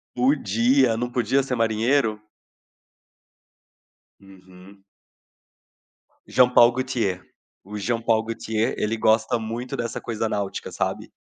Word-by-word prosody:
Podia, 125 -1 +2
não 120 +2 -3
podia 125 +3 +1
ser 130 -1 -3
marinheiro? 115 0 +1 2.0
Uhum. 95 0 -17 1.5
Jean-Paul 125 -1 +5
Gaultier, 120 -7 -2 0.4
o 105 +2 -8
Jean-Paul 115 +1 0
Gaultier 110 0 -2
ele 110 +1 -1
gosta 110 +2 +2
muito 115 +3 -5
dessa 115 - -4
coisa 115 -1 -3
náutica, 100 -2 -4
sabe? - - -3
115 Hz, 95 wpm, -23 LUFS, 105-125 Hz, 2.0 s, Jean-Paul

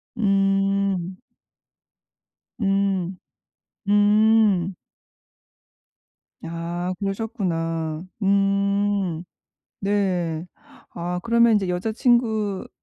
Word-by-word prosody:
음. 195 -3 +1 1.4
음. 195 -3 0 0.7
음. 205 -2 +4 1.7
야. 170 +2 -4
그러셨구나. 170 -7 -2 0.2
음 200 -2 +1 0.6
네. 185 -5 -1 0.5
아 175 +1 -3
그러면 235 0 +4
인제 200 -3 +1
여자 180 +5 -2
친구는 220 -4 +1
195 Hz, 105 characters per minute, -23 LUFS, 180-205 Hz, 1.7 s, 음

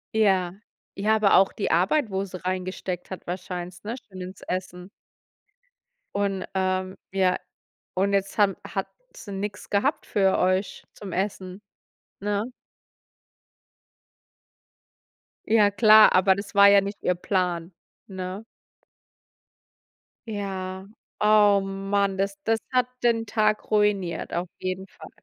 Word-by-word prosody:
Ja. 190 -5 +3 0.4
Ja, 215 +2 +2
aber 210 -4 +4
auch 195 0 +4
die 205 - -2
Arbeit, 210 - +2
wo 190 +1 -1
sie 185 -1 -7
reingesteckt 185 -1 -3
hat 190 - -8
wahrscheinlich, 180 0 -6
ne? 225 +4 -4
Still 190 -7 -12
ins 185 +2 -8
Essen. 180 0 -5 1.3
Und, 195 -2 -1
ähm 185 0 -1 0.2
ja, 185 -1 +2 0.6
und 200 +2 +1
jetzt 195 +1 0
haben 200 -2 +3
hat - - -3 0.3
sie 205 - -10
nix 200 +2 -5
gehabt 210 +9 0
für 195 -2 +2
euch 185 +2 0
zum 200 -2 -9
Essen, 190 0 -3 0.6
ne? 205 +3 -2 3.0
Ja, 215 -2 +4
klar, 215 +1 +7
aber 190 +1 +5
das 200 +1 -7
war 200 0 +8
ja 200 - +7
nicht 200 +1 -6
ihr 180 - +2
Plan, 180 -2 -1 0.3
ne? 190 +2 -6 1.8
Ja, 190 -2 -5 0.3
oh 210 -1 +5
man, 195 0 -1
das 195 +1 -1
das 225 0 +2
hat 250 -1 +2 0.2
den 230 -1 +2
Tag 215 -1 0
ruiniert 210 -4 +1
auf 175 +1 -2
jeden 185 +1 -4
Fall. - - -13
195 Hz, 125 wpm, -25 LUFS, 185-205 Hz, 3.0 s, war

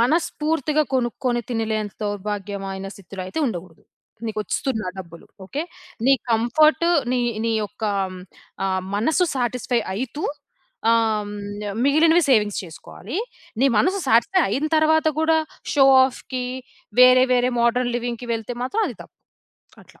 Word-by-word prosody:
మనస్ఫూర్తిగా 305 +2 +1
కొనుక్కొని 240 0 -1
తినలేనంత 220 -3 -2
దౌర్భాగ్యమైన 200 -1 -4
స్థితిలో 195 -1 -8
అయితే 255 - -3
ఉండకూడదు. 175 -4 -8 0.4
నీకు 215 -1 -4
వస్తున్నాయి 215 -2 -2
డబ్బులు, 170 -2 -10 0.2
ఓకే. 280 +11 -3 0.4
నీ 275 - +6 0.2
కంఫర్టు 305 +9 +3 0.2
నీ, 255 - +1 0.3
నీ 230 - +1
యొక్క 220 +3 -8 0.3
హ్మ్, 185 - -9 0.4
ఆహ్, 190 -1 0
మనస్సు 310 - +2
సాటిస్ఫై 245 -1 0
అయితూ 260 +8 -4 0.7
ఆహ్, 220 -2 +2
హ్మ్, 205 - -7 0.5
మిగిలినవి 320 +4 +5
సేవింగ్స్ 210 -5 +3
చేసుకోవాలి. 185 - -9 0.5
నీ 275 - +6
మనసు 380 - +2
సాటిస్ఫై 240 +12 +4
అయిన 275 +9 -1
తర్వాత 315 0 +3
కూడా, 320 0 +3 0.4
షో 270 -2 +6 0.2
ఆఫ్‌కి, 255 0 -5 0.6
వేరే, 255 0 +8
వేరే 250 0 +2
మోడర్న్ 240 +1 +1
లివింగ్‌కి 240 0 -4
వెళ్తే 225 +2 -5
మాత్రం 410 - 0
అది - - -8
తప్పు. - - -21 0.7
అట్లా - - -22
240 Hz, 130 wpm, -22 LUFS, 210-280 Hz, 0.7 s, వేరే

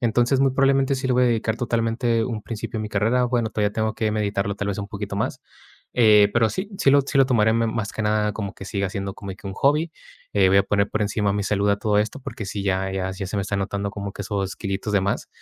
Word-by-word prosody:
Entonces, 120 +2 +2
muy 135 -1 +4
probablemente 135 0 +2
sí 130 0 -3
lo 125 - +2
voy 125 - +3
a - - +4
dedicar 115 -1 0
totalmente 115 0 0
un 110 -3 -4
principio 115 0 -5
de - - -3
mi 105 - -4
carrera, 110 +5 +1
bueno, 120 -3 0
todavía 105 -1 0
tengo 110 -1 -1
que 110 -2 0
meditarlo 100 -1 -1
tal 100 - -3
vez 100 - -2
un 100 -1 -4
poquito 100 -2 -5
más, 100 - -2 0.5
eh, 105 -4 +6
pero 115 -2 +3
sí 190 +2 -4
sí 135 - +4
lo 140 0 +5
sí 135 - -3
lo 135 - +6
tomaré 110 -4 +3
ma 115 0 +2
más 110 -2 -3
que 110 - -3
nada 105 0 +1
como 100 -2 -5
que - - -10
siga 100 -1 -2
siendo 100 0 -4
como 100 - -8
de 95 - -7
que 100 - -11
un 95 - -4
hobby. 150 +7 +2 0.4
Eh, 95 -2 +4
voy 95 - +4
a - - +5
poner 100 0 +1
por 110 - -2
encima 100 0 0
mi 100 -1 -1
salud 100 0 +1
a 100 - +2
todo 105 0 +1
esto, 110 +7 -1
porque 110 - -6
sí 100 0 -4
ya 95 0 0
ya 95 -1 -2
ya 95 0 -5
se 105 - -4
me 100 - 0
está 100 - -3
notando 100 +1 -2
como 100 -1 -5
que 100 - -6
esos 100 0 -3
kilitos 100 +1 -3
de 100 - +3
más, 100 +1 -2
105 Hz, 275 wpm, -23 LUFS, 100-115 Hz, 0.5 s, eh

